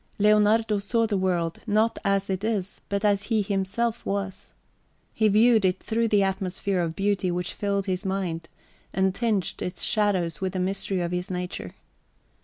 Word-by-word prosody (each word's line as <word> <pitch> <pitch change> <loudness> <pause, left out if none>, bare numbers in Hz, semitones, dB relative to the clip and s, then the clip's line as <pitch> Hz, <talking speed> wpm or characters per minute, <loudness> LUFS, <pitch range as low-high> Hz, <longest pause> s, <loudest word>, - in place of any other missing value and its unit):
Leonardo 210 +1 +4
saw 230 +3 +1
the 215 -2 -1
world 175 -3 0
not 215 +2 +2
as 195 -1 +1
it 190 0 -2
is, 205 -4 -2
but 200 +1 -1
as 205 -1 +2
he 220 -3 +1
himself 205 +4 -1
was. 195 -1 -4 0.6
He 220 - +2
viewed 220 +1 +5
it 185 0 +2
through 230 +1 0
the 205 -2 +3
atmosphere 190 0 -1
of 165 -1 -2
beauty 195 -2 0
which 175 0 -2
filled 200 -1 -1
his 185 0 -2
mind, 185 -4 -3 0.4
and 190 0 +2
tinged 215 -4 -1
its 180 0 -3
shadows 190 -7 +1
with 190 -1 -1
the 185 - -2
mystery 190 0 0
of 170 0 -2
his 180 0 -3
nature. 180 - -5
195 Hz, 170 wpm, -26 LUFS, 185-210 Hz, 0.6 s, viewed